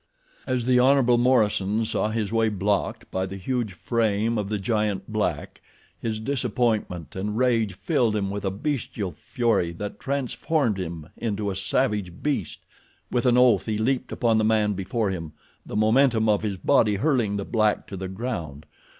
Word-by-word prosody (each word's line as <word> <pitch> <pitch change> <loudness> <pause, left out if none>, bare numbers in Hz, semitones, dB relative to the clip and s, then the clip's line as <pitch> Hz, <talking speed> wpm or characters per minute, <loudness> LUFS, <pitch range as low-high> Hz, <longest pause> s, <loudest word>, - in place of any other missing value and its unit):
As 125 -2 0
the 125 0 +4
Hon. 135 +2 +5 0.2
Morison 110 -4 +2
saw 110 - 0
his 110 -1 -2
way 115 -1 +3
blocked 100 0 -1
by 95 0 -1
the 95 +1 -7
huge 115 0 -2
frame 110 +2 0
of 100 -1 -3
the 105 - -1
giant 105 -1 -1
black 90 -8 -2 0.4
his 110 -2 -3
disappointment 115 - -1
and 105 +3 -3
rage 115 -5 +2
filled 105 +3 +1
him 100 -2 -1
with 100 0 -4
a 95 - +1
bestial 105 -3 -3
fury 115 -8 0
that 105 +4 -6
transformed 140 -3 -1
him 85 -3 -6
into 105 -3 -2
a - - -4
savage 100 -2 -1
beast. 145 -2 -2 0.5
With 125 0 +1
an 125 0 +4
oath 120 -6 +4
he 110 -1 0
leaped 130 +3 0
upon 115 -2 +2
the - - +2
man 110 -1 +2
before 100 +2 -1
him, 80 -4 -5 0.3
the - - -6
momentum 110 +1 +3
of 105 -1 +3
his 105 -3 -2
body 110 -1 +3
hurling 120 -4 +1
the 100 - -3
black 110 -2 +1
to 100 - -8
the 95 0 -5
ground. 90 - -5
110 Hz, 170 wpm, -25 LUFS, 100-120 Hz, 0.5 s, Hon